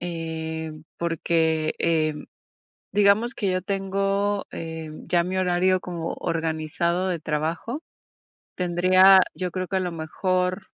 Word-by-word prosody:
em, 160 -2 -5
porque, 160 -1 +1
em, 155 -2 0 0.7
digamos 205 +4 +3
que 200 -4 -1
yo 185 0 0
tengo, 195 +1 -1
em, 160 -1 -7
ya 170 0 +3
mi 185 +1 -3
horario 185 0 +2
como 170 -2 -4
organizado 165 +2 -1
de 180 -2 -1
trabajo. 160 - -3 0.7
Tendría 185 +2 +6
yo, 180 -2 -3
creo 185 -1 -3
que 195 - -1
a - - +2
lo 180 -2 -2
mejor 180 +4 -1
175 Hz, 125 wpm, -24 LUFS, 160-185 Hz, 0.7 s, Tendría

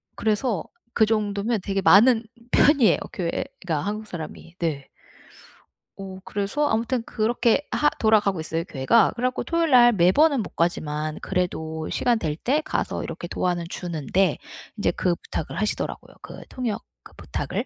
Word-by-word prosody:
그래서 215 -3 0 0.3
그 220 - +4
정도면 215 0 0
되게 195 -1 -1
많은 230 +5 +6 0.3
편이에요, 265 - +5 0.2
교회가 170 -1 -3
한국 215 +2 -4
사람이. 165 0 -8
네. 150 -5 -3 1.1
어 190 -1 -7
그래서 205 +9 -1
아무튼 230 +2 0
그렇게 235 +4 +1
하 295 - +3
돌아가고 210 -5 +3
있어요, 165 +1 -2
교회가. 140 - +3
그래 245 - -2
갖고 255 - -3
토요일 335 -2 0
날 240 -1 +7
매번은 245 - +4
못 - - -11
가지만 155 -2 -1
그래도 160 -4 -2
시간 240 -2 +1
될 150 -2 -2
때 290 +5 +2
가서 - - -2
이렇게 175 - -6
도와는 175 -1 -1
주는데 175 -1 -1 0.4
이제 - - +1
그 175 -2 0
부탁을 160 - -5
하시더라고요, 215 - -3
그 - - -10
통역 235 -4 -3 0.2
그 - - -15
부탁을. - - -4
200 Hz, 330 characters per minute, -24 LUFS, 170-235 Hz, 1.1 s, 날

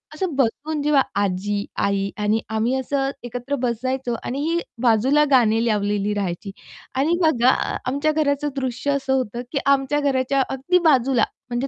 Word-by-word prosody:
असं 340 -2 -2
बसून 285 +4 -1
जेव्हा 290 -2 +3 0.2
आजी, 200 +1 -1
आई 200 0 0
आणि 210 +1 +1
आम्ही 220 +3 0
असं 270 +1 -1
एकत्र 245 +3 -4
बसायचो 250 +1 -1
आणि 265 +3 -3
ही 340 +1 +1 0.2
बाजूला 255 +6 +4
गाणे 225 -3 +4
लावलेली 205 -1 0
राहायची. 195 -1 -3 0.4
आणि 315 +6 +2
बघा 255 -7 +4 0.4
आमच्या 280 +4 +1
घराचं 295 -1 0
दृश्य 260 +1 -2
असं 270 -1 0
होतं, 240 -3 -1
की 280 - 0
आमच्या 280 +1 +2
घराच्या 275 -1 +1
अगदी 270 +8 +1
बाजूला 260 -3 +3 0.3
म्हणजे 245 +3 -2
260 Hz, 150 wpm, -22 LUFS, 225-280 Hz, 0.4 s, बाजूला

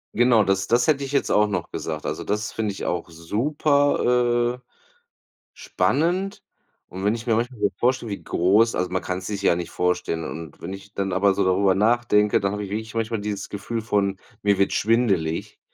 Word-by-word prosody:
Genau 120 -2 +5
das 95 0 +1
das 120 +5 +2
hätte 140 -2 +2
ich 135 - -5
jetzt 140 - +1
auch 105 0 +4
noch 105 - -3
gesagt. 75 -2 -5
Also, - - -3
das 105 +1 -2
finde 110 -2 -2
ich 95 - -7
auch 85 -1 -2
super, 125 - +1
äh, - - -56 0.9
spannend. 185 +6 -1 0.5
Und 95 +2 -6
wenn 105 - +2
ich 115 0 -7
mir 115 - +3
manchmal 120 0 -2
so 100 - +2
vorstelle, 120 -3 0
wie 100 - -5
groß 105 +6 +3
also, 90 0 -1
man 95 0 -1
kann's 90 0 -4
sich 100 -2 -4
ja 85 - +3
nicht 85 -1 -4
vorstellen. 90 -2 -1
Und 80 -2 -8
wenn 95 +3 -5
ich 100 +2 -11
dann 95 -2 -2
aber 95 +1 +3
so 100 -1 0
darüber 95 +1 +3
nachdenke, 105 0 +3
dann 100 0 0
habe 105 0 -3
ich 95 - -9
wirklich 110 +1 -4
manchmal 115 -1 -2
dieses 100 -2 -4
Gefühl 110 +3 -4
von: 100 -3 0 0.2
„Mir 100 -1 +2
wird 100 - +2
schwindelig“, 100 -8 0
105 Hz, 200 wpm, -23 LUFS, 95-120 Hz, 0.9 s, Genau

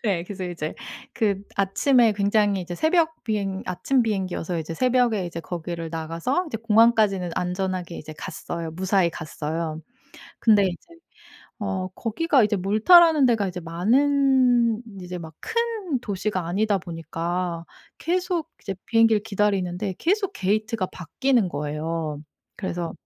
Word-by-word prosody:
예 175 -4 0
그래서 190 -1 -6
이제 170 -3 -4 0.4
그 200 -3 0
아침에 225 +4 +3
굉장히 205 -1 +2
이제 175 0 -6
새벽 320 - +1
비행 200 -3 -2
아침 255 +8 +1
비행기여서 185 -5 -2
이제 160 +1 -5
새벽에 245 -4 +2
이제 170 -1 -6
거기를 170 -1 -5
나가서 165 - -2
이제 245 - -3
공항까지는 215 -4 +3
안전하게 180 -1 -2
이제 155 0 -9
갔어요. 165 0 -5
무사히 185 0 +1
갔어요. 160 0 -4 0.6
근데 210 -3 +5
이제 180 -2 -1 0.8
어 190 -3 -2
거기가 245 - +1
이제 210 0 +1
몰타라는 280 - +6
데가 220 -5 +2
이제 180 0 -6
많은 245 - +3 0.2
이제 180 0 -6
막 160 -2 -9
큰 450 - -2
도시가 200 -4 -2
아니다 200 +3 +1
보니까 170 0 -4 0.3
계속 355 -1 -1
이제 195 - -4
비행기를 225 -1 +4
기다리는데 195 -3 -1
계속 395 +3 +1
게이트가 215 +1 -1
바뀌는 215 - 0
거예요. 150 +1 -3 0.3
그래서 175 -3 -3
195 Hz, 315 characters per minute, -24 LUFS, 175-235 Hz, 0.8 s, 몰타라는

